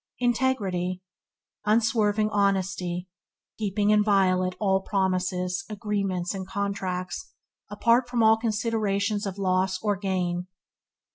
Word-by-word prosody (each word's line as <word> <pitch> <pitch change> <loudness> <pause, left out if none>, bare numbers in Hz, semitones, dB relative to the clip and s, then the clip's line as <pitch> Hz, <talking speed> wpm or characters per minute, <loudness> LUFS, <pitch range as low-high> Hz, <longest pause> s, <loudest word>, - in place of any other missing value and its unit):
Integrity 205 -8 0 0.3
– - - -44
Unswerving 215 -1 +2
honesty; 190 -3 0 0.5
keeping 205 0 +1
inviolate 190 -3 +3
all 190 -2 +2
promises, 185 -2 -1
agreements, 200 -4 -2
and 190 -1 -5
contracts, 190 - -3 0.4
apart 240 +1 +2
from 240 -2 +1
all 220 0 +6
considerations 215 -2 0
of 195 0 -5
loss 185 -1 +1
or 205 -1 +2
gain. 180 -2 -2
200 Hz, 100 wpm, -26 LUFS, 185-215 Hz, 0.5 s, all